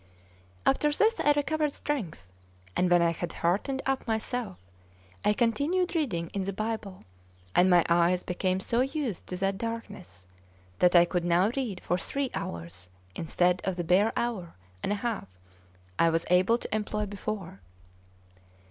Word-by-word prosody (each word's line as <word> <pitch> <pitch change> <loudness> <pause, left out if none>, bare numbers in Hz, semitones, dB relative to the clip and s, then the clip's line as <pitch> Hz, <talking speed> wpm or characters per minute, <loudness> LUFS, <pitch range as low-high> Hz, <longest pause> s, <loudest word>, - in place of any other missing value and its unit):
After 295 +2 +3
this 440 +9 +2
I 295 - +4
recovered 300 +1 0
strength; 195 - -4 0.5
and 180 - +2
when 175 -1 +5
I 170 - +3
had 170 +1 -5
heartened 210 +11 0
up 270 -1 -1
myself, 220 -2 -2 0.7
I 210 - +4
continued 290 - +1
reading 200 - -1
in 195 -2 -2
the 195 - -3
Bible, 215 -2 -4 0.5
and 185 +1 +5
my 175 -2 +5
eyes 175 +1 +3
became 185 +1 -1
so 235 +4 +1
used 270 - -2
to 180 - -4
that 195 +1 -1
darkness 230 - -6 0.5
that 180 0 +4
I 175 0 +8
could 175 0 -1
now 175 +4 +3
read 230 -9 -3
for 180 - -1
three 275 +4 -2
hours 85 +2 -6 0.2
instead 175 - +1
of 190 -1 -1
the 175 - -2
bare 190 +6 +3
hour 215 -8 -2 0.3
and - - -1
a - - +2
half 230 - -2 0.7
I 165 - +5
was 165 0 0
able 185 +6 +4
to 225 - -4
employ 210 0 -1
before. 200 - -5
195 Hz, 155 wpm, -28 LUFS, 175-240 Hz, 0.7 s, I